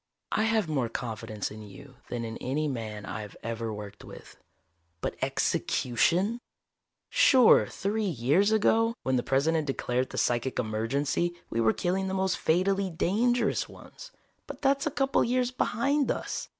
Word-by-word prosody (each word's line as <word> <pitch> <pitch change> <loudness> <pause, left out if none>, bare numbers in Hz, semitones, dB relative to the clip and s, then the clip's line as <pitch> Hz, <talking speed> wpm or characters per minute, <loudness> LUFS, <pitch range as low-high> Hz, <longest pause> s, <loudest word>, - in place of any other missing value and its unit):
"I 215 - +2
have 220 -4 +1
more 135 -7 -1
confidence 110 -3 -4
in 110 +1 -9
you 125 +6 -13
than 120 -1 -3
in 115 0 -5
any 150 +4 -1
man 110 -6 -5
I've 105 -1 -6
ever 115 0 -3
worked 105 -1 -8
with. - - -12 0.6
But - - -3
execution! 180 - +1 0.7
Sure, 275 - +6
three 210 +2 -2
years 160 - +2
ago, 225 +1 +3
when 130 - +1
the 125 - +2
President 150 +5 +1
declared 130 -1 -1
the - - -7
psychic 120 +2 0
emergency, 135 +10 -1 0.2
we 115 - 0
were 110 -1 +4
killing 190 +8 -1
the 190 - -2
most 190 -1 0
fatally 190 +4 +1
dangerous 225 +9 +1
ones. - - -13 0.4
But - - -9
that's 275 +2 +2
a - - +2
couple 270 -2 +1
years 250 +1 +1
behind 275 +3 0
us. - - -3
160 Hz, 150 wpm, -28 LUFS, -, 0.7 s, Sure